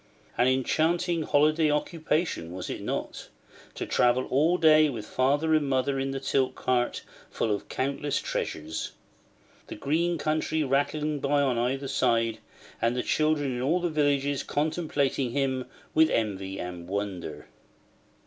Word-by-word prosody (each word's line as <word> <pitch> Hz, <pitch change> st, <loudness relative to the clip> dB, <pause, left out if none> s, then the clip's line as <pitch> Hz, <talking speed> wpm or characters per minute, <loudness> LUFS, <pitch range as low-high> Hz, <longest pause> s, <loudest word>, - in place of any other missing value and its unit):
An 125 Hz, -, +3 dB
enchanting 165 Hz, +6 st, +1 dB
holiday 155 Hz, +1 st, +3 dB
occupation, 150 Hz, -, -1 dB
was 90 Hz, 0 st, -5 dB
it -, -, -5 dB
not? -, -, -4 dB, 0.5 s
to -, -, -4 dB
travel 125 Hz, +1 st, +2 dB
all 155 Hz, +7 st, +3 dB
day 155 Hz, -2 st, +6 dB
with 115 Hz, -6 st, -5 dB
father 145 Hz, +7 st, +1 dB
and 150 Hz, -3 st, +2 dB
mother 135 Hz, +1 st, +1 dB
in 135 Hz, 0 st, -1 dB
the 135 Hz, 0 st, -3 dB
tilt 135 Hz, -1 st, 0 dB
cart 125 Hz, -1 st, 0 dB, 0.3 s
full 110 Hz, -, -1 dB
of 100 Hz, -, -5 dB
countless 140 Hz, +2 st, -1 dB
treasures; 80 Hz, +1 st, -4 dB, 0.7 s
the -, -, -7 dB
green 165 Hz, +8 st, 0 dB
country 155 Hz, 0 st, 0 dB
rattling 145 Hz, +2 st, 0 dB
by 140 Hz, +1 st, +2 dB
on 125 Hz, -4 st, +1 dB
either 135 Hz, +3 st, -1 dB
side, 115 Hz, -4 st, +1 dB, 0.4 s
and 115 Hz, +1 st, +2 dB
the 125 Hz, -, -1 dB
children 155 Hz, -4 st, +1 dB
in 120 Hz, -, -3 dB
all 155 Hz, +8 st, +2 dB
the 175 Hz, -1 st, -1 dB
villages 145 Hz, -2 st, +1 dB
contemplating 145 Hz, -5 st, -1 dB
him 130 Hz, -2 st, 0 dB, 0.3 s
with 160 Hz, 0 st, +5 dB
envy 95 Hz, -3 st, -2 dB
and 90 Hz, -1 st, -6 dB
wonder? 90 Hz, -6 st, -4 dB
140 Hz, 145 wpm, -27 LUFS, 120-155 Hz, 0.7 s, day